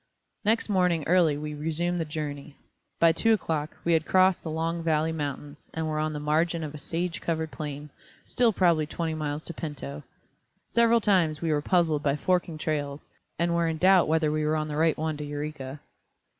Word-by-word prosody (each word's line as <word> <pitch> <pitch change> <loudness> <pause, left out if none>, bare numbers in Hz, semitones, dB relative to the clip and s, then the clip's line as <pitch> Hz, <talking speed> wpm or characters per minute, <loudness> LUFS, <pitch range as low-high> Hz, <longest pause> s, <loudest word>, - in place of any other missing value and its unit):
Next 225 +2 +2
morning 180 -5 +2
early 165 -4 +3
we 150 0 -5
resumed 165 +4 -1
the - - -1
journey. 150 -1 -6 0.4
By 165 -1 +6
two 225 +7 +3
o'clock 160 -7 -2
we 170 - +3
had 160 -1 +3
crossed 185 +1 +3
the 160 - -6
Long 165 +2 -2
Valley 160 -1 +1
Mountains 145 -1 -6
and 160 -1 -2
were 155 -1 -1
on 155 0 0
the 150 - -4
margin 160 +3 +1
of 150 -1 -5
a 150 - -8
sage 170 +4 -3
covered 160 -1 -2
plain, 145 -1 -6 0.3
still 240 -2 +2
probably 170 -6 +2
twenty 165 0 -3
miles 150 -1 -3
to 170 - -5
Pinto. 145 -2 -6 0.7
Several 235 0 +4
times 175 -8 +2
we 165 -1 -1
were 150 -1 +1
puzzled 160 -3 +2
by 140 -2 +1
forking 175 +1 0
trails, 145 -2 -3 0.3
and 170 0 +1
were 170 0 +2
in 160 -1 -1
doubt 185 +2 +5
whether 155 -1 +2
we 155 0 0
were 155 +1 +1
on 155 0 -2
the 150 - -4
right 160 +1 +2
one 155 -1 -2
to 150 - -5
Eureka. 145 -1 -5
160 Hz, 200 wpm, -27 LUFS, 150-170 Hz, 0.7 s, By